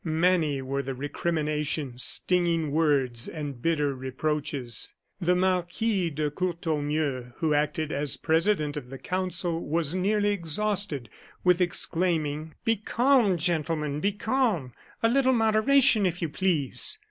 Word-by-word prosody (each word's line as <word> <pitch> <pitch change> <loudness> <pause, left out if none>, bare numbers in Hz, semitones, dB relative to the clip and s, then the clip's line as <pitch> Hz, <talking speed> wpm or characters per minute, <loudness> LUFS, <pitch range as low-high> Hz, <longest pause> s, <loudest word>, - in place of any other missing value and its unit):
Many 160 -4 +1
were 135 +1 -2
the 135 -1 -5
recriminations, 150 -2 -2
stinging 170 -4 +1
words, 140 -6 +1
and 145 -6 -6
bitter 150 -3 +1
reproaches. 130 -1 -3 0.3
The 180 -1 +2
Marquis 185 +1 0
de 150 -1 -2
Courtornieu, 150 -6 -2
who 160 -3 +1
acted 150 +1 0
as 145 0 0
president 160 -2 +1
of 135 -4 -6
the 135 - -7
council, 175 +2 -2
was 160 0 0
nearly 205 +3 +1
exhausted 195 - 0 0.4
with 180 0 +4
exclaiming: 160 -4 0
"Be 225 0 +2
calm, 235 -2 +3
gentlemen, 155 -3 0
be 200 +5 0
calm! 215 - 0 0.3
A - - +6
little 260 +2 +3
moderation, 225 0 +4
if 180 0 -3
you 165 - -2
please!" 160 -6 0
160 Hz, 125 wpm, -27 LUFS, 145-185 Hz, 0.4 s, A